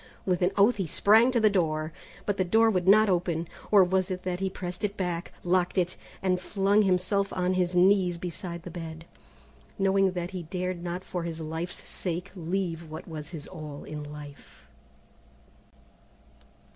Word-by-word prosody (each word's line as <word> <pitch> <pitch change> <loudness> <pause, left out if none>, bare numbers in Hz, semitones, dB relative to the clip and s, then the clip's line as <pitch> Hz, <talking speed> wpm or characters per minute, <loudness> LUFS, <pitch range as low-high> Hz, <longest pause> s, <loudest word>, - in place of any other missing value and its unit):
With 180 -2 +1
an 180 - +4
oath 205 +4 +5
he 190 -4 -1
sprang 220 - +5
to 250 -2 +2
the 220 - +5
door, 155 -4 0 0.3
but 205 -1 0
the 185 - +2
door 225 +5 +4
would 185 -3 0
not 215 +2 +7
open, 170 -3 0 0.2
or 205 -2 +7
was 185 +1 +1
it 185 -1 -4
that 180 -1 -2
he 190 0 0
pressed 180 0 -6
it 205 0 -1
back, 175 -2 -2
locked 180 +1 +1
it, 180 -1 +1 0.3
and 185 -1 +1
flung 200 +2 +2
himself 195 +1 +1
on 185 0 +1
his 180 -1 0
knees 180 -1 +4
beside 170 0 -6
the 175 - -8
bed, 165 -1 -7 0.7
knowing 195 -1 +3
that 175 0 -3
he 185 -2 -4
dared 180 +1 -3
not 175 +1 -4
for 180 - -4
his 165 -1 -4
life's 160 +3 -5
sake 180 +1 -4
leave 170 -2 -3
what 155 - -8
was 155 -3 -7
his 160 -4 -7
all 155 -5 -8
in 150 -1 -6
life. 145 - -11
180 Hz, 175 wpm, -28 LUFS, 170-190 Hz, 0.7 s, not